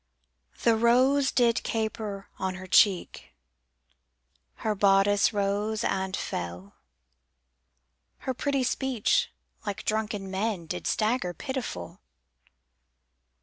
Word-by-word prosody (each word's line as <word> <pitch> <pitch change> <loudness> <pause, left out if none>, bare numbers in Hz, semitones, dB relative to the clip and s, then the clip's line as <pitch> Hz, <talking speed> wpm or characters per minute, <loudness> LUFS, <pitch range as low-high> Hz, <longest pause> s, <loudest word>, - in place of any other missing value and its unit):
The 230 - +5
rose 255 +5 +4
did 235 -2 +3
caper 215 -3 -3
on 190 -1 -2
her 185 0 -8
cheek, 185 0 +2 1.2
Her 215 - -1
bodice 200 +1 +4
rose 205 +1 -1
and 190 -1 -1
fell, 90 +3 -5 1.5
Her 260 - 0
pretty 275 +1 0
speech, 265 - +1 0.3
like 205 -2 -5
drunken 210 -3 -2
men, 195 -2 -2
Did 180 +2 -4
stagger 215 -5 0
pitiful. 260 - -5
210 Hz, 95 wpm, -27 LUFS, 190-235 Hz, 1.5 s, The